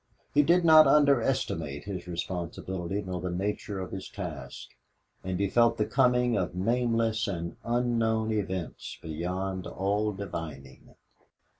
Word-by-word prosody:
He 145 - +6
did 170 +4 +3
not 155 -1 +9
underestimate 120 - +2
his 95 -3 -6
responsibility 90 +2 -4
nor 90 -2 -4
the 90 - -2
nature 100 +2 -3
of 95 - -5
his 95 -1 -6
task, 90 -8 -7 0.5
and 95 0 -3
he 100 - +2
felt 115 +3 +3
the 105 - +1
coming 125 -2 +3
of 90 -3 -1
nameless 115 +2 +1
and 85 -4 -4
unknown 115 -2 +1
events 95 -5 -3
beyond 90 +4 -3
all 105 +3 0
divining. 80 -9 -8
100 Hz, 130 wpm, -28 LUFS, 90-115 Hz, 0.5 s, not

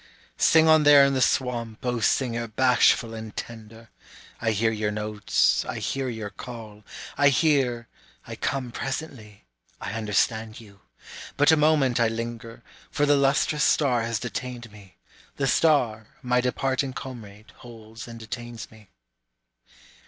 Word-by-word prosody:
Sing 160 0 +5
on 160 -1 +6
there 145 -2 +7
in 140 - +1
the 130 - 0
swamp, 120 -3 -1
O 125 -1 -1
singer 120 0 0
bashful 120 0 +2
and 110 -1 -9
tender! 115 0 -9 0.5
I 115 - 0
hear 110 +1 +1
your 105 -1 -2
notes, 105 0 0
I - - -6
hear 135 -1 -3
your 110 -3 -6
call, 110 0 -10 0.4
I 145 0 +6
hear, 130 -5 +1 0.4
I - - -8
come 130 -3 -3
presently, 130 - -7 0.3
I - - -6
understand 110 +1 -1
you; 100 -3 -16 0.6
But 145 +2 +5
a - - +6
moment 150 -5 +2
I 115 - +3
linger, 115 0 -6 0.3
for 145 - 0
the 145 0 +4
lustrous 140 +1 +1
star 130 -6 +2
has 115 0 -2
detained 120 -1 -6
me, 100 -3 -16 0.4
The 140 - -1
star 125 -8 +2 0.2
my 125 0 +1
departing 130 +1 -1
comrade 110 -6 -10
holds 115 -1 -12
and 115 -1 -10
detains 115 0 -8
me. 110 -3 -18
120 Hz, 145 wpm, -25 LUFS, 110-135 Hz, 0.6 s, there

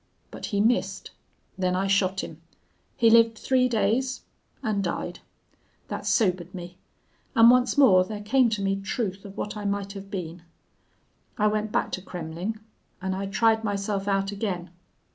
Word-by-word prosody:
But - - -6
he 200 - -1
missed. 240 +4 0 0.5
Then 180 -1 +1
I 190 +1 0
shot 195 -1 +1
him.... 160 +1 -9 0.6
He 230 -1 +5
lived 230 -1 +5
three 255 +1 +2
days 240 +4 0 0.4
and 210 -4 0
died. 175 0 -3 0.7
That - - -4
sobered 185 -4 +1
me. 180 0 -9 0.6
And 230 +1 +8
once 250 +2 +3
more 195 -10 +7
there 210 +2 -6
came 250 +3 +3
to 210 -3 -2
me 195 0 +1
truth 195 -2 -3
of 200 -1 -10
what 210 - -4
I 210 - -5
might 200 -1 -2
have 195 -1 -9
been. 175 -4 -5 1.0
I 210 - +2
went 215 0 0
back - - 0
to 185 - -3
Kremmling. 180 +4 -5 0.4
And 190 0 -2
I 195 +1 -3
tried 225 +2 +2
myself 200 -1 -2
out 195 0 +1
again. 190 -4 -4
200 Hz, 160 wpm, -26 LUFS, 190-220 Hz, 1.0 s, And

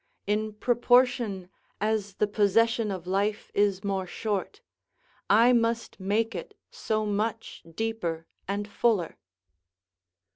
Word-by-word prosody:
In 215 +1 -1
proportion 240 -3 +2 0.3
as 210 -2 -1
the 210 - +2
possession 220 +2 +2
of 185 -3 -5
life 200 +3 -1
is 200 -1 +1
more 195 -2 -2
short, 205 +1 -3 0.7
I 230 +4 +6
must 230 -2 0
make 215 +4 0
it - - -7
so 215 -1 -1
much 215 +2 -2
deeper 180 -8 -2 0.2
and 200 +1 -2
fuller. 210 -4 0
210 Hz, 110 wpm, -27 LUFS, 200-225 Hz, 0.7 s, I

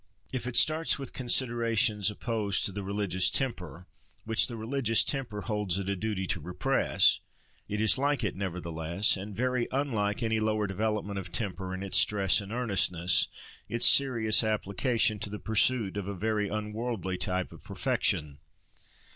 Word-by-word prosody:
If 125 -1 -3
it 125 - -4
starts 160 +1 +4
with 135 -3 -6
considerations 115 -4 +2
opposed 105 -2 -1
to - - +2
the 100 +1 -5
religious 100 -2 +1
temper, 90 - -3 0.4
which 110 +1 +3
the 120 - -6
religious 115 -1 +2
temper 125 -7 -2
holds 105 -4 -1
it 100 -1 -4
a 100 - -1
duty 100 -1 -3
to - - -2
repress, 90 +4 +2 0.5
it 105 - -3
is 110 +4 +3
like 140 -1 0
it, 105 - -2
nevertheless, 85 0 -1
and 100 +1 -7
very 125 +1 -1
unlike 115 -7 -1
any 110 -1 0
lower 110 -1 0
development 100 0 -2
of 90 -3 -8
temper, 95 +1 -3
in 95 +1 -5
its 100 - +1
stress 100 -1 +3
and 100 +1 -9
earnestness, 90 -7 +2 0.4
its 115 - +1
serious 115 -6 +4
application 110 +2 0
to 105 - -1
the 105 - -6
pursuit 110 -1 +1
of 100 -2 -4
a 100 - -4
very 105 +2 -1
unworldly 105 -3 -4
type 90 -1 -2
of - - -13
perfection. 70 -2 -1
105 Hz, 160 wpm, -29 LUFS, 95-115 Hz, 0.5 s, starts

